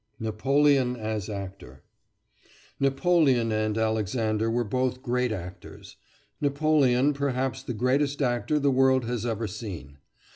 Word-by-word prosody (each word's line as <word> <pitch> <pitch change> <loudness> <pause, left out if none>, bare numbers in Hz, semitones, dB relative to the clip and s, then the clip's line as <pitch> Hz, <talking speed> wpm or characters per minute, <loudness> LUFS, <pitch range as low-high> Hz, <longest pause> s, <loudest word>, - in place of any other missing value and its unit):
NAPOLEON 130 +4 +2
AS 110 -3 -4
ACTOR 95 -10 -8 1.0
Napoleon 135 -4 +2
and 110 0 0
Alexander 110 0 0
were 120 +1 0
both 125 +3 -2
great 125 -1 0
actors 90 -3 -8 0.5
Napoleon 145 -2 +2
perhaps 135 -2 -2
the 125 -3 -5
greatest 135 +5 +1
actor 125 +2 0
the 140 -1 +2
world 130 -1 +3
has 120 0 -3
ever 115 -1 -2
seen. 95 -10 -8
125 Hz, 115 wpm, -26 LUFS, 110-135 Hz, 1.0 s, world